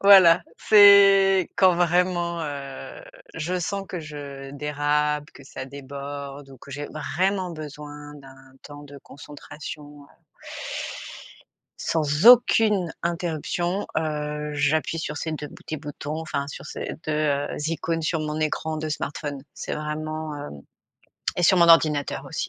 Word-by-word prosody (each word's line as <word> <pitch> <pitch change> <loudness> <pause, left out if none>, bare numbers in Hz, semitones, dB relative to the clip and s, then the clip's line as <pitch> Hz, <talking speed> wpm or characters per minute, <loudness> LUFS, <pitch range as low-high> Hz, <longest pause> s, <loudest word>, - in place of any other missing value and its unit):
Voilà 190 -4 +8 0.2
c'est 195 -3 +7
quand 185 -2 +5
vraiment, 175 0 +1
heu, 140 - -7 0.3
je 180 +4 -2
sens 195 +3 -3
que 180 - -4
je 140 -3 -8
dérape, 150 +1 0
que - - -14
ça 130 -1 -7
déborde 140 +1 -8
ou 135 - -13
que 140 - -14
j'ai 145 +2 -5
vraiment 185 +4 -1
besoin 150 -2 -9
d'un 135 -1 -16
temps 145 0 -11
de 145 -1 -12
concentration 145 +1 -10
heu - - -25 1.6
sans 155 +2 0
aucune 220 -6 +6
interruption, 175 +2 -2
heu, 150 -1 -3
j'appuie 150 +3 +1
sur 155 - -4
ces 160 - -3
2 150 -1 -5
petits 155 - -7
boutons, 150 +1 -6
enfin 150 -3 -3
sur 140 - -8
ces - - -5
2, 155 - 0
heu, 145 -2 +1 0.2
icônes 165 0 -2
sur 160 0 0
mon 155 0 -3
écran 155 +1 -1
de 155 0 -3
smartphone. 145 -1 -4
C'est - - -5
vraiment, 155 0 -4
heu 145 0 -6 0.9
et - - +1
sur 185 +2 +5
mon 170 -1 +6
ordinateur 155 -3 +4
aussi. - - -4
150 Hz, 140 wpm, -24 LUFS, 145-170 Hz, 1.6 s, Voilà